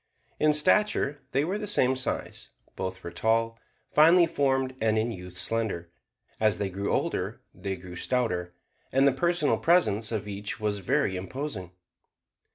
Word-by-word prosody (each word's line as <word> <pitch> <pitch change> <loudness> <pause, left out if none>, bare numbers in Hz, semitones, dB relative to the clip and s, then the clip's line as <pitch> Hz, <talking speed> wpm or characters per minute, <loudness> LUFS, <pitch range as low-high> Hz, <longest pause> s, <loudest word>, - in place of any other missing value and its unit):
In 155 0 +4
stature 150 -2 +2
they 135 +3 +1
were 190 +5 -2
the 210 - -4
same 130 -10 +2
size: 130 - -4 0.3
both 95 0 -5
were 85 - -6
tall, 115 +5 +1 0.3
finely 170 +3 +7
formed, 135 -4 0
and 110 -1 +2
in 110 +2 0
youth 90 -3 -9
slender. 95 -6 -2 0.5
As 110 -1 +3
they 100 -2 -2
grew 100 +2 -2
older - - -1
they 95 +2 -4
grew 90 -1 -10
stouter, 90 -4 -1 0.4
and 135 +1 +4
the - - +5
personal 170 +1 +1
presence 115 - +2
of 105 -2 -3
each 100 0 -5
was 105 -1 -1
very 95 0 +1
imposing. 95 - -5
115 Hz, 155 wpm, -27 LUFS, 95-140 Hz, 0.5 s, finely